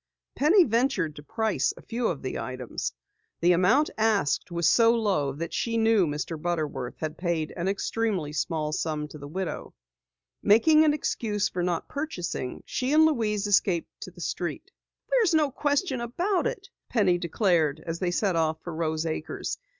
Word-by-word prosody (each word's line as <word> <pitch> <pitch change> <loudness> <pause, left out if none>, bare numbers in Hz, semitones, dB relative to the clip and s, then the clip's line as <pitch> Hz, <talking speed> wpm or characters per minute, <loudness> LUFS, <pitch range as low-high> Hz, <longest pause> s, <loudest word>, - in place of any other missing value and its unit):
Penny 340 +8 +5
ventured 230 - 0
to - - -7
price 220 +5 0
a - - -11
few 235 0 -2
of 145 -6 -3
the 130 - -3
items. 130 -2 -4 0.5
The 175 +1 +4
amount 185 - +3
asked 215 -10 +1
was 170 -1 +1
so 230 +5 +5
low 195 -11 +1
that 165 +4 -5
she 230 -1 -1
knew 220 -5 +4
Mr. 150 +2 -4
Butterworth 150 -7 -3
had 155 -1 -5
paid 170 -3 -1
an 175 +1 -2
extremely 200 -5 -1
small 155 -1 -1
sum 155 -1 -2
to 150 - -10
the 145 - -8
widow. 185 +4 -5 0.7
Making 305 +9 +5
an 300 - +4
excuse 210 -8 -1
for 180 - -3
not 175 -1 -1
purchasing, 185 - -4
she 255 +1 -2
and 315 +1 +7
Louise 215 -9 +1
escaped 195 -4 +2
to - - -6
the - - -13
street. - - -4 0.4
"There's 450 -9 +3
no 300 -3 +3
question 285 -1 0
about 350 - 0
it," - - -6 0.2
Penny 185 -6 +2
declared 170 -4 +1
as 165 0 -4
they 180 - 0
set 185 +1 0
off 160 -1 +1
for 175 - -6
Rose 160 0 -1
Acres. 160 -1 -4
185 Hz, 170 wpm, -27 LUFS, 160-230 Hz, 0.7 s, and